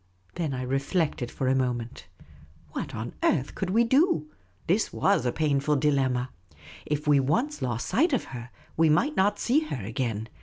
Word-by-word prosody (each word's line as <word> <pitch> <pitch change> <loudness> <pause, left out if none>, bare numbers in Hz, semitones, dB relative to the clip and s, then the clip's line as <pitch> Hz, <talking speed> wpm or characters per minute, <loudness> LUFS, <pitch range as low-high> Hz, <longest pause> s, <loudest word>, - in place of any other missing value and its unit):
Then 165 -4 -2
I 130 - -3
reflected 135 0 -1
for 130 - -3
a 130 - +3
moment. 125 -4 -2 0.6
What - - -5
on 115 +2 -5
earth 140 -4 +1
could 190 - -3
we 225 +5 +4
do? 250 - +2 0.3
This 195 +6 +1
was 195 -9 +2
a - - +1
painful 150 -1 +1
dilemma. 130 -3 +1 0.6
If 150 0 -2
we 145 -1 +5
once 230 - 0
lost 120 -2 -2
sight 320 +8 +2
of 260 - +1
her, 120 -1 -7 0.3
we 160 0 +4
might 275 - +2
not 200 +2 +2
see 260 +5 +2
her 135 - -5
again. 115 -1 -3
145 Hz, 175 wpm, -27 LUFS, 125-190 Hz, 0.6 s, we